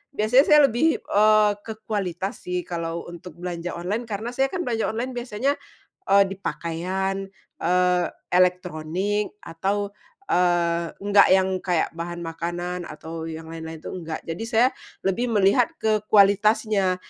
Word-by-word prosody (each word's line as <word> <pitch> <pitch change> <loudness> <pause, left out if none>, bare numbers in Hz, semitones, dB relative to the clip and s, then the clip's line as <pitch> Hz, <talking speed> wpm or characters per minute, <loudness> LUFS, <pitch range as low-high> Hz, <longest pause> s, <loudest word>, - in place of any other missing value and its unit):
biasanya 250 +6 +4
saya 300 0 +7
lebih, 310 +8 +2
eee, 215 0 +4
ke 220 +1 -7
kualitas 195 0 -3
sih 180 0 -2
kalau 170 -1 -4
untuk 175 -1 -10
belanja 175 0 -5
online, 195 +8 -3
karena 215 +2 -4
saya 265 +2 +1
kan 355 +5 -4
belanja 230 -5 -1
online 240 +3 -2
biasanya, 245 +3 -1 0.5
eee, 200 0 +6
di 195 - -6
pakaian, 190 +3 -2 0.3
eee, 180 0 +2 0.2
elektronik, 180 +3 0
atau, 200 +5 -2 0.4
eee, 170 -1 +2 0.2
enggak 205 0 +6
yang 190 0 +3
kayak 175 -3 0
bahan 175 0 -5
makanan 175 +2 -4
atau 160 +1 -7
yang 160 0 -7
lain-lain 160 -1 -7
itu - - -6
enggak, 165 -3 -6
jadi 165 +6 -5
saya 235 +1 +4 0.4
lebih 195 +6 0
melihat 210 +1 +3
ke 215 -1 +2
kualitasnya, 205 -1 +4
190 Hz, 140 wpm, -24 LUFS, 170-215 Hz, 0.5 s, saya